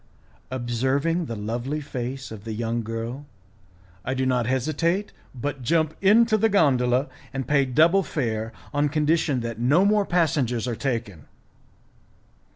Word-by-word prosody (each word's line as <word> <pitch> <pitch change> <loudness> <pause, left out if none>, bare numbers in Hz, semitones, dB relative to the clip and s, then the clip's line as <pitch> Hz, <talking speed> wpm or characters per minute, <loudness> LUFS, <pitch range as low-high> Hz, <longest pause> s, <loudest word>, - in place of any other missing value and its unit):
Observing 130 +7 0
the 115 - -5
lovely 120 +8 -3
face 135 -2 -5
of 105 -2 -9
the 110 -1 -5
young 115 +1 -2
girl, 115 +5 -5 0.8
I 130 - -2
do 130 0 0
not 125 -3 +1
hesitate, 155 - 0 0.2
but 140 +2 -4
jump 160 +4 +1
into 215 +2 +5
the 225 +2 +3
gondola, 130 - +3 0.2
and 135 -1 -4
pay 140 -2 +3
double 160 +9 +4
fare, 115 - -2 0.2
on 145 0 +2
condition 150 -3 +1
that 115 -1 -5
no 145 +11 +4
more 205 -1 +3
passengers 140 -9 +1
are 120 - -2
taken. 115 - -3
130 Hz, 140 wpm, -24 LUFS, 120-155 Hz, 0.8 s, into